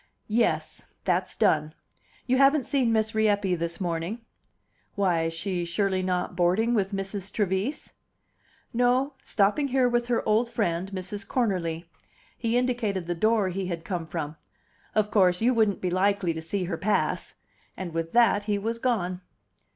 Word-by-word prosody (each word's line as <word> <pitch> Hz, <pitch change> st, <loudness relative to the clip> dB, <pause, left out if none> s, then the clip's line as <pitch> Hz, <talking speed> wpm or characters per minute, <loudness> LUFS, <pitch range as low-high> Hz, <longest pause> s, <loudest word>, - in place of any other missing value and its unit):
"Yes. 210 Hz, -9 st, 0 dB, 0.2 s
That's 185 Hz, 0 st, 0 dB
done. 155 Hz, -7 st, +2 dB, 0.5 s
You 255 Hz, 0 st, +2 dB
haven't 275 Hz, 0 st, +4 dB
seen 260 Hz, -4 st, +1 dB
Miss 220 Hz, 0 st, +1 dB
Rieppe 205 Hz, -3 st, +2 dB
this 170 Hz, -1 st, -2 dB
morning?" 175 Hz, +5 st, -3 dB, 0.7 s
"Why, 175 Hz, -5 st, +1 dB
she's 175 Hz, +1 st, -3 dB
surely 190 Hz, +1 st, +1 dB
not 180 Hz, -1 st, -1 dB
boarding 185 Hz, +7 st, +2 dB
with 200 Hz, -3 st, +1 dB
Mrs. 195 Hz, 0 st, -3 dB
Trevise?" 200 Hz, +6 st, -2 dB, 0.8 s
"No; 250 Hz, +4 st, +2 dB
stopping 210 Hz, +8 st, +2 dB
here 260 Hz, -1 st, +3 dB
with 240 Hz, 0 st, 0 dB
her 240 Hz, -1 st, 0 dB
old 220 Hz, +3 st, +2 dB
friend, 190 Hz, -4 st, -1 dB
Mrs. 195 Hz, +1 st, -5 dB
Cornerly." 180 Hz, -9 st, -1 dB, 0.5 s
He 230 Hz, 0 st, 0 dB
indicated 235 Hz, -7 st, 0 dB
the 175 Hz, -, -1 dB
door 215 Hz, +2 st, +2 dB
he 185 Hz, +1 st, -3 dB
had 170 Hz, -2 st, -5 dB
come 175 Hz, -4 st, -3 dB
from. 155 Hz, -2 st, -4 dB, 0.6 s
"Of 215 Hz, -1 st, +2 dB
course, 180 Hz, -3 st, +4 dB
you 245 Hz, +3 st, +3 dB
wouldn't 220 Hz, -4 st, +2 dB
be 180 Hz, -, -1 dB
likely 190 Hz, -1 st, +1 dB
to 160 Hz, -, -5 dB
see 185 Hz, +4 st, -2 dB
her 175 Hz, -2 st, -3 dB
pass!" 210 Hz, +4 st, 0 dB, 0.4 s
And 180 Hz, -3 st, -5 dB
with 165 Hz, 0 st, -2 dB
that 230 Hz, -4 st, +4 dB
he 210 Hz, -1 st, +1 dB
was 225 Hz, +3 st, -3 dB
gone. 185 Hz, -8 st, -1 dB
200 Hz, 155 wpm, -26 LUFS, 175-230 Hz, 0.8 s, haven't